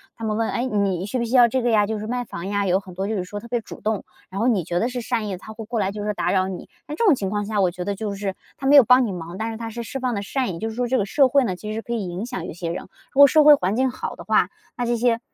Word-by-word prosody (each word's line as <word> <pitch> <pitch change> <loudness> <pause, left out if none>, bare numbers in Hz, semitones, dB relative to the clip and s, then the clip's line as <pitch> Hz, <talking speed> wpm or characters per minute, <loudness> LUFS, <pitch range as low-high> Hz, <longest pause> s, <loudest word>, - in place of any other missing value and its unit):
他 230 - -10
们 215 -1 -1
问： 225 0 +1
“哎， 240 - -1
你 200 -6 0
需 230 - -2
不 235 - 0
需 235 +3 -1
要 245 -2 +8
这 255 +2 -1
个 240 - +2
呀？” 210 -2 +3
就 220 - -1
是 210 - -5
卖 245 +2 -2
房 170 -6 -7
呀， 200 0 0
有 185 +1 +3
很 190 -2 -12
多， 190 +2 -3
就 220 - -1
是 185 - -1
说 205 +3 -6
特 235 - -11
别 240 0 -1
主 - - -11
动， 215 -1 -1 0.3
然 190 +1 -5
后 230 - +2
你 215 -8 +2
觉 175 +2 -2
得 225 - +1
是 250 -1 -4
善 230 -2 -2
意 - - -3
的， 185 - -5
他 220 - -10
会 220 0 -8
过 230 +1 -2
来， 195 -1 0
就 205 0 -5
是 210 - 0
打 - - -1
扰 185 -1 +2
你。 190 -1 -7 0.2
在 295 - -5
这 335 - -1
种 370 -9 +6
情 195 -5 -3
况 205 -1 -1
下 215 -1 -1
我 185 -2 +2
觉 180 +1 -6
得 200 +2 -2
就 205 0 -4
是， 195 -1 -4 0.2
他 270 - -3
没 285 - +6
有 280 - +10
帮 250 +2 +5
你 - - -3
忙， 175 +1 -7
但 220 +1 -2
是 225 - -5
他 225 0 -6
是 235 +2 -5
释 270 +4 -5
放 250 -1 -1
的 200 - -2
善 245 0 -2
意。 165 - -7
就 225 - -2
是 220 - -8
说 245 +1 0
这 255 +2 +1
个 200 - 0
社 275 +5 +4
会 275 +2 +3
呢 185 - -2
其 210 +4 -6
实 225 - -3
可 235 - -5
以 215 -5 -2
影 180 +6 -5
响 245 -9 -5
一 - - -6
些 170 0 -5
人， 170 - -4 0.3
如 270 - -2
果 285 - +12
社 300 +3 +5
会 300 0 +9
环 195 -6 -1
境 260 +2 +2
好 250 - -5
的 - - -10
话， - - +2 0.3
那 245 - -1
这 240 0 0
些 230 0 +2
220 Hz, 390 characters per minute, -23 LUFS, 195-245 Hz, 0.3 s, 果